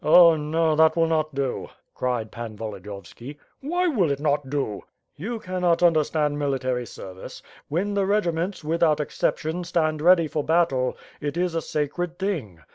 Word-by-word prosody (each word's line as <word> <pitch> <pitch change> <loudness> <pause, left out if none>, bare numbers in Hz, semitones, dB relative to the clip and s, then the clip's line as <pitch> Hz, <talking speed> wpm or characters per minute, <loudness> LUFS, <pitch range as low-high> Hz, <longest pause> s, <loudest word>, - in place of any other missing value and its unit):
"Oh, 170 +1 +8
no, 155 +1 +1
that 160 0 +5
will 165 -1 +3
not 155 -2 0
do," 135 -2 -2 0.2
cried 120 -4 -2
Pan 115 -2 -7
Volodiyovski. 105 +5 -8 0.2
"Why 350 +6 0
will 210 - +2
it 140 -1 -1
not 145 -2 0
do?" 135 -8 -2 0.3
"You 225 +10 -4
cannot 180 -3 0
understand 155 -3 +2
military 130 -4 -1
service. 95 -2 -10 0.3
When 190 +7 -1
the 200 - +1
r^ 200 -3 +1
ments, 170 +3 -3
without 160 -1 +2
exception, 160 +3 -1
etand 160 -3 0
ready 170 -1 +5
for 150 0 -2
battle, 155 -6 +1 0.2
it 145 +2 -3
is 180 -1 0
a 165 - 0
sacred 160 +4 -3
thing. 150 - -3
155 Hz, 160 wpm, -24 LUFS, 140-175 Hz, 0.3 s, Oh